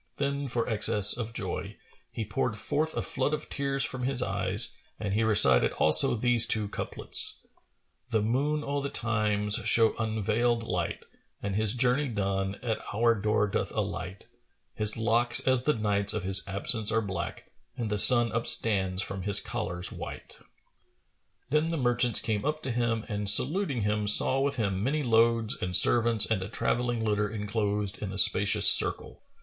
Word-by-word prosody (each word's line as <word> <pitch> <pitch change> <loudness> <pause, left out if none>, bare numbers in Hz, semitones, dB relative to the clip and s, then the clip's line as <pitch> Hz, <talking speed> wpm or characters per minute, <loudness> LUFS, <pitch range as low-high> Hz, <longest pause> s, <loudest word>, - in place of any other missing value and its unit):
Then, 140 0 -3
for 120 -2 -3
excess 105 -2 +3
of 115 -2 -6
joy, - - -6 0.3
he 110 - -6
poured 105 +1 -3
forth 155 +8 -2
a - - -2
flood 140 +3 -2
of - - -10
tears 140 -1 -2
from 130 0 -5
his 125 0 -1
eyes 100 +1 0 0.2
and 100 -3 -4
he 110 +2 0
recited 105 - +3
also - - +2
these 120 0 +3
two 110 -2 0
couplets, - - 0 0.6
"The 110 -2 -1
Moon 145 +7 -2
o' 140 0 -3
the 140 - -5
Time,[FN#440] 105 -3 -2
shows 115 -1 +3
unveilиd 110 +2 -2
light; 90 -6 -5 0.2
* - - -36
And, 100 -1 -4
his 110 +2 +3
journey 125 +4 0
done, 100 -3 -3
at 115 -3 -3
our 115 +2 +1
door 105 0 -1
doth 100 - -4
alight: 90 +1 -6 0.5
His 105 +1 +1
locks 115 +2 +1
as 130 -1 +3
the 150 - +1
nights 100 -2 0
of 105 - -4
his 95 +1 +3
absence 105 +3 -1
are 115 +1 0
black 95 -2 -7
* 120 - -42
And 115 -4 -5
the 105 - +1
sun 120 +1 +7
upstands 100 -5 -1
from 95 -1 -7
his 100 +1 +2
collar's[FN#441] 90 +1 -1
white." - - -9 1.1
Then 155 +2 0
the 165 - -3
merchants 120 -3 +2
came 105 -2 -3
up 155 +2 -4
to 130 - -4
him 115 -2 -2
and 105 -2 -2
saluting 140 - +2
him, 105 0 -2
saw 130 +5 +3
with 140 +1 -1
him 100 -5 -3
many 145 +5 -2
loads 115 0 +1
and 90 0 -2
servants 115 +2 +4
and 110 -4 -2
a 95 - -7
travelling 120 0 -2
litter 105 -1 -1
enclosed 105 -1 -4
in 100 -2 -6
a 95 - -8
spacious 100 +1 +5
circle. - - +5
110 Hz, 175 wpm, -26 LUFS, 105-120 Hz, 1.1 s, sun